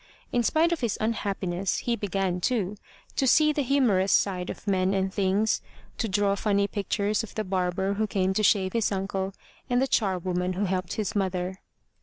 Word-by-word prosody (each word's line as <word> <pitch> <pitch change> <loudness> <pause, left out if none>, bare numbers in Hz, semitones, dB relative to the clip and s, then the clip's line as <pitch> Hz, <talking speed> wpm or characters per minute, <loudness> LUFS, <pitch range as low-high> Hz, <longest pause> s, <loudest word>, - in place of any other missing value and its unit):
In 245 - +2
spite 320 +8 +2
of 340 - 0
his 235 -5 -1
unhappiness 195 -4 -1
he 240 - -1
began, 195 -4 -1
too, 210 -3 0 0.4
to 270 - +1
see 305 +3 +5
the 290 - 0
humorous 245 -8 +2
side 185 -2 +1
of - - -7
men 190 -1 +1
and 190 0 0
things, 200 +2 +1 0.4
to 225 - -1
draw 200 0 +2
funny 200 0 +1
pictures 205 +1 -1
of 225 - -9
the 215 - -1
barber 190 0 0
who 215 +2 0
came 190 -1 0
to 215 - +1
shave 195 -2 +3
his 230 -3 +1
uncle, 195 0 -2 0.4
and 245 0 +3
the 265 - +3
charwoman 185 -4 0
who 195 +3 -1
helped 185 -2 -2
his 215 -3 -3
mother. 185 -1 -1
200 Hz, 185 wpm, -27 LUFS, 185-220 Hz, 0.4 s, see